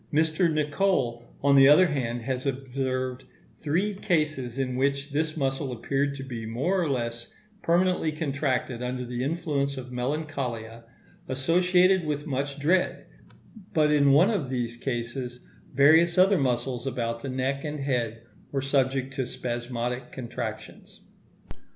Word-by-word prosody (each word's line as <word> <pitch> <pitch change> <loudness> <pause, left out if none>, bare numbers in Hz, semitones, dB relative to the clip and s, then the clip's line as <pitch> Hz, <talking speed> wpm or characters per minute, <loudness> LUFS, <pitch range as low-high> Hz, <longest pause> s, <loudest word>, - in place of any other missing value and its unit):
Mr. 160 +3 +2
Nicol, 145 -6 0
on 140 0 +5
the 135 0 +8
other 150 +6 +7
hand, 120 -7 -2
has 130 +2 -2
observed 130 -1 -2 0.4
three 180 +8 0
cases 150 - -1
in 130 -2 -1
which 140 +2 0
this 155 +2 -1
muscle 135 -1 -1
appeared 140 +4 -1
to 135 - -6
be 120 -4 -6
more 135 +13 0
or 165 - 0
less 120 -3 -3 0.3
permanently 175 -1 +2
contracted 140 -5 -2
under 125 0 -3
the 120 +1 -3
influence 140 -3 -1
of 125 -1 -7
melancholia, 125 -4 -3 0.4
associated 180 +7 +3
with 150 -1 -2
much 140 0 -2
dread; 175 +6 +1 0.7
but 150 -1 +4
in 140 -2 +5
one 170 +10 +5
of 165 - -1
these 120 -2 -2
cases, 120 0 -4 0.3
various 160 +6 +5
other 190 0 +5
muscles 125 -1 -1
about 115 -2 -2
the 135 - -5
neck 130 +2 -1
and 150 -1 -4
head 120 -4 -1 0.3
were 140 - 0
subject 135 -1 0
to 135 -3 -2
spasmodic 120 +1 -4
contractions. 120 -3 -7
135 Hz, 140 wpm, -27 LUFS, 125-150 Hz, 0.7 s, the